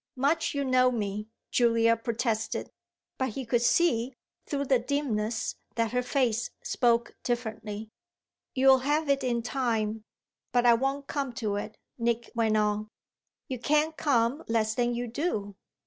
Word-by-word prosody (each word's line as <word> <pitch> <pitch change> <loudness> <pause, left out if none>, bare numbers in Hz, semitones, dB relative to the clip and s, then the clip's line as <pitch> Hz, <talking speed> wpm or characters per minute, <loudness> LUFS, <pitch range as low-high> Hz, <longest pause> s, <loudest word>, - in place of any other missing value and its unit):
"Much 290 +4 +1
you 280 -1 0
know 255 -1 +4
me!" 210 -2 -3 0.2
Julia 230 -1 +4
protested; 230 -1 -2 0.5
but 260 0 +1
he 260 +4 -5
could 235 0 +1
see, 245 -2 +2 0.3
through 280 -1 -1
the 265 -2 +3
dimness, 235 -5 -1 0.2
that 230 -2 0
her 250 - +1
face 245 -3 0
spoke 235 -1 +1
differently. 220 -3 -4 0.6
"You'll 265 0 +6
have 295 +3 0
it 275 -1 +2
in 235 -2 0
time, 225 -4 -1 0.5
but 245 -1 +2
I 240 - +8
won't 270 +4 0
come 275 -3 -3
to 215 -4 -2
it," 210 +1 -6 0.2
Nick 235 0 -1
went 225 -2 +2
on. 210 0 +1 0.6
"You 255 -2 -4
can't 300 +5 +2
come 275 0 +1
less 220 -1 +1
than 240 +1 0
you 240 +1 -2
do." 225 - -2
240 Hz, 145 wpm, -28 LUFS, 225-270 Hz, 0.6 s, I